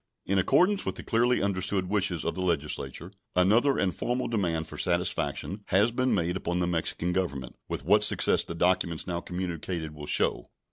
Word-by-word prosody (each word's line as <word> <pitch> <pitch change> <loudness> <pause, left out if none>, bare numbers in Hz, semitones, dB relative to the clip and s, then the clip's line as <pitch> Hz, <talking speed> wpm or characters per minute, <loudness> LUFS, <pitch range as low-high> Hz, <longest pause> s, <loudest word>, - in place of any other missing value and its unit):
In 100 0 +1
accordance 180 - +3
with - - -3
the - - -7
clearly 120 0 +2
understood 95 -1 0
wishes 95 -5 0
of 85 - 0
the 95 - -4
Legislature, 80 -5 -2 0.2
another 110 +10 +4
and 95 -3 +1
formal 125 +7 -2
demand 85 -8 -1
for - - -9
satisfaction 90 +3 -1
has 105 +5 +3
been 130 +2 0
made 90 -1 0
upon 90 -2 -2
the 90 - +1
Mexican 85 0 -1
Government, 70 -9 -3
with - - -4
what - - +4
success - - +4
the 85 - -7
documents 90 -1 +1
now 85 -2 -2
communicated 85 -3 -4
will 75 -1 -9
show. - - 0
90 Hz, 180 wpm, -28 LUFS, 85-100 Hz, 0.2 s, another